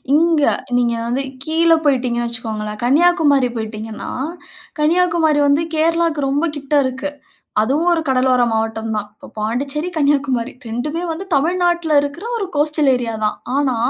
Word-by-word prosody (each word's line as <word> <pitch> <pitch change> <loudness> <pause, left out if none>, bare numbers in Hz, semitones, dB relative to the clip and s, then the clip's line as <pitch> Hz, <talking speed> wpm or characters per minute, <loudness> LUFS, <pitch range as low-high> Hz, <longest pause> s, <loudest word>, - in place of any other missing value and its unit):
இங்க 325 -2 +3 0.3
நீங்க 240 -1 +2
வந்து 260 +3 -1 0.2
கீழ 330 +1 +2
போய்விட்டீங்கனு 250 -3 +1
வச்சிக்கோங்களேன் 215 -2 -4
கன்னியாகுமரி 290 -3 +3
போயிடீங்கன்னா 220 0 -6 0.7
கன்னியாகுமரி 330 -2 +3
வந்து 285 +3 +3
கேரளாக்கு 325 -3 +1
ரொம்ப 290 +4 +1
கிட்ட 285 +1 -2
இருக்கு. 265 +3 -3 0.5
அதுவும் 290 +10 +1
ஒரு 330 -1 +2
கடலோர 255 -1 +3
மாவட்டம் 225 0 -2
தான். 210 0 -3
இப்போ - - -14
பாண்டிச்சேரி, 275 +9 -2
கன்னியாகுமரி 275 -4 +1 0.2
2மே 295 +9 -3
வந்து 325 +4 -4
தமிழ்நாட்டில்ல 345 +1 +2
இருக்குற 285 +8 -5
ஒரு 400 - -2
கோஸ்டல் 295 -1 +2
ஏரியா 240 -2 -2
தான். 210 - +1 0.2
ஆனா, 280 -3 +1
285 Hz, 135 wpm, -18 LUFS, 240-320 Hz, 0.7 s, இங்க